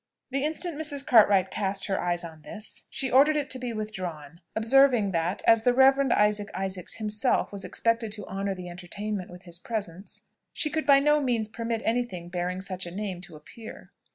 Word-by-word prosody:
The 275 +1 -1
instant 315 +1 -1
Mrs. 290 -3 -2
Cartwright 205 -5 +5
cast 195 -1 -1
her 195 - -1
eyes 175 0 -1
on 160 -2 -9
this, 210 +8 -8
she 265 -2 -2
ordered 290 +4 +5
it 290 -1 -2
to 260 - -3
be 250 -1 -4
withdrawn, 180 -8 -6
observing 235 -2 +4
that, 170 +3 -1
as 225 -1 +6
the 245 +2 +2
Reverend 270 +1 +5
Isaac 210 0 +2
Isaacs 190 -1 -4
himself 215 +3 0
was 200 -2 -7
expected 230 -1 0
to 210 -3 -5
honour 195 0 -3
the 180 -1 -8
entertainment 185 +3 -5
with 180 +1 -12
his 175 -1 -9
presence, 195 -3 -6 0.3
she 305 - -2
could 315 0 -2
by 280 -1 +7
no 295 +1 +4
means 235 -5 0
permit 230 +1 -3
any 235 +2 +2
thing 180 -8 -7
bearing 180 +1 -3
such 185 -2 -4
a - - -5
name 190 -1 -4
to 180 - -11
appear. 220 +9 -12
210 Hz, 195 wpm, -27 LUFS, 185-245 Hz, 0.3 s, by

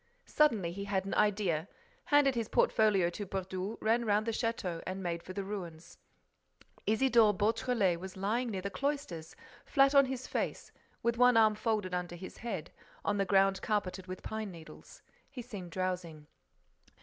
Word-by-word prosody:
Suddenly, 225 - +2
he 200 +3 -5
had 195 -2 -1
an 195 - -3
idea, 195 -6 +1 0.4
handed 290 -2 +4
his 230 -3 -2
portfolio 200 -5 +3
to 205 +3 -5
Brédoux, 190 +2 -4
ran 230 +2 +2
round 210 -1 +2
the 230 - 0
château 220 -7 -2
and 190 +1 -4
made 170 -1 -2
for 185 - -9
the 200 +1 -3
ruins. 175 -5 -7 0.9
Isidore 220 -1 +4
Beautrelet 215 -3 +1
was 190 +1 -8
lying 225 +6 0
near 190 -4 -4
the 200 - -3
cloisters, 275 - -3 0.3
flat 275 -1 +4
on 280 -1 +7
his 260 -1 -4
face, - - -3 0.3
with 235 0 0
one 250 -1 +6
arm 220 -1 +6
folded 210 -4 -1
under 180 -1 -3
his 185 +2 -9
head, 195 -9 -5 0.3
on 205 - +1
the 195 - +1
ground 195 0 +3
carpeted 195 -3 -2
with 185 0 -7
pine 220 -1 -4
needles. 165 -3 -13 0.3
He 250 -3 -7
seemed 205 -7 -8
drowsing. 180 -4 -3
200 Hz, 165 wpm, -32 LUFS, 185-230 Hz, 0.9 s, on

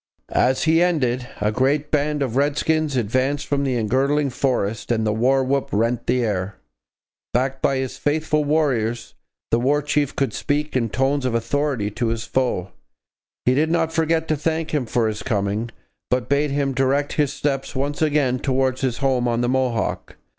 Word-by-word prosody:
As 130 +1 +2
he 165 +1 +4
ended, 130 -8 +1
a 105 +1 +2
great 140 +5 +1
band 150 -1 +1
of 125 -3 -3
redskins 150 +1 +1
advanced 130 +5 0
from 140 -1 0
the 130 -2 0
engirdling 135 +5 +1
forest, 115 -5 -1
and 110 -2 +1
the 105 - +1
war 130 +4 +2
whoop 135 +1 0
rent 115 +3 0
the 125 0 +2
air. 100 -2 -2 0.8
Backed 130 +2 0
by 135 - +2
his 130 -1 -4
faithful 150 0 +1
warriors, 130 -7 0 0.4
the 115 - +3
War 140 +4 +2
Chief 145 -1 0
could 135 -6 0
speak 150 0 -2
in 115 -3 +1
tones 135 +4 0
of 125 -2 0
authority 115 -2 -1
to 120 +3 -2
his 115 0 -2
foe. 120 -9 -1 0.7
He 125 - +4
did 155 +4 +2
not 165 -1 +1
forget 160 0 +1
to 155 - +2
thank 160 +1 -2
him 140 -6 0
for 115 0 +1
his 105 -1 -3
coming, 105 0 -1 0.4
but 125 -1 0
bade 140 +2 +2
him 140 -1 0
direct 135 +2 +1
his 145 -3 +1
steps 135 -1 -2
once 145 +3 -2
again 145 -5 +2
towards 130 -1 0
his 130 -3 0
home 125 -2 +2
on 120 0 0
the 120 - +1
Mohawk. 130 -3 -1
130 Hz, 180 wpm, -22 LUFS, 120-145 Hz, 0.8 s, he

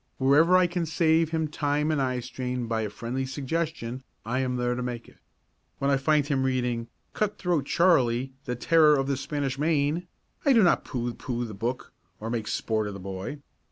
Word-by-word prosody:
Wherever 150 +7 +5
I 185 - +5
can 175 -1 -2
save 160 +1 +3
him 160 -1 0
time 150 0 0
and 150 -3 +1
eyestrain 125 -1 -2
by 115 -1 0
a 105 - -2
friendly 120 +5 -4
suggestion, 135 -2 -3 0.2
I 120 +3 -1
am 130 -1 0
there 125 0 0
to 125 - -3
make 120 -1 -4
it. - - -18 0.6
When 140 0 +1
I 135 - +4
find 150 +1 +2
him 140 -2 0
reading 125 -3 0 0.3
"Cut 210 -1 -1
Throat 170 -6 0
Charley, 130 -7 +3
the 125 - -2
Terror 155 +4 +5
of 135 - 0
the 140 0 0
Spanish 135 -1 -3
Main," 155 +2 +1 0.4
I 280 - +5
do 230 -4 +6
not 175 - +3
pooh 120 -2 -3
pooh 120 -1 -3
the 110 - -7
book 115 +6 -4 0.3
or 110 +2 -4
make 115 -3 -2
sport 110 -2 -1
of 100 - -5
the - - -7
boy. 95 +10 -6
135 Hz, 195 wpm, -27 LUFS, 120-155 Hz, 0.6 s, do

